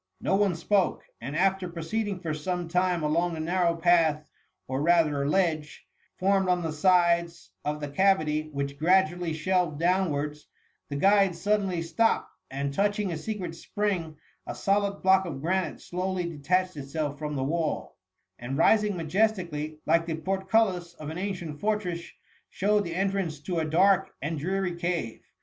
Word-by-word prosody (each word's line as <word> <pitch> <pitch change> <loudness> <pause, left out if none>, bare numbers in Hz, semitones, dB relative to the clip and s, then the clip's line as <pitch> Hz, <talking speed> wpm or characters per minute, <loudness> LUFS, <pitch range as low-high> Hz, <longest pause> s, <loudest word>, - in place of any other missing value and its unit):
No - - +1
one 195 -3 +2
spoke; 190 +3 +1 0.2
and 135 +5 -5
after 190 +1 +1
proceeding 185 +4 -3
for 160 -3 -2
some 175 +3 -3
time 180 -1 +1
along 165 +3 +1
the - - -6
narrow 170 +1 +1
path, 165 -3 +3 0.4
or 130 +1 -2
rather 150 -4 +3
ledge, 155 -4 0 0.3
formed 190 0 +2
on 180 -1 +2
the 160 - -2
sides 170 0 +2
of 150 +1 -2
the 145 - -4
cavity, 155 -2 +1
which 140 0 -4
gradu 175 +1 +4
ally 175 -2 -3
shelved 160 -1 0
downwards, 150 -5 0 0.4
the 140 - -4
guide 195 +3 +4
suddenly 190 -1 0
stopped, 225 +8 +1 0.2
and 140 +1 -3
touching 205 +2 0
a - - -2
secret 185 -1 -4
spring, 170 -3 -3 0.3
a - - -4
solid 200 0 0
block 190 0 +5
of 140 -5 -5
granite 185 +5 -1
slowly 180 0 -3
detached 180 +4 0
itself 145 +1 -4
from 150 -1 -3
the 135 - -1
wall, 160 +2 -2 0.4
and, 130 +3 -4
rising 210 +3 +3
majestically 165 -4 -1
like 165 +1 +2
the 160 - -1
portcullis 190 0 0
of 155 0 -7
an 165 - -5
ancient 175 -6 -4
fortress, 205 -5 -1 0.5
showed 205 +1 +1
the 170 -1 -4
entrance 190 -5 -1
to 170 +3 -2
a 160 - 0
dark 190 +5 +3
and 155 +2 -3
dreary 185 +3 -1
cave. 170 -9 -3
170 Hz, 160 wpm, -27 LUFS, 155-190 Hz, 0.5 s, block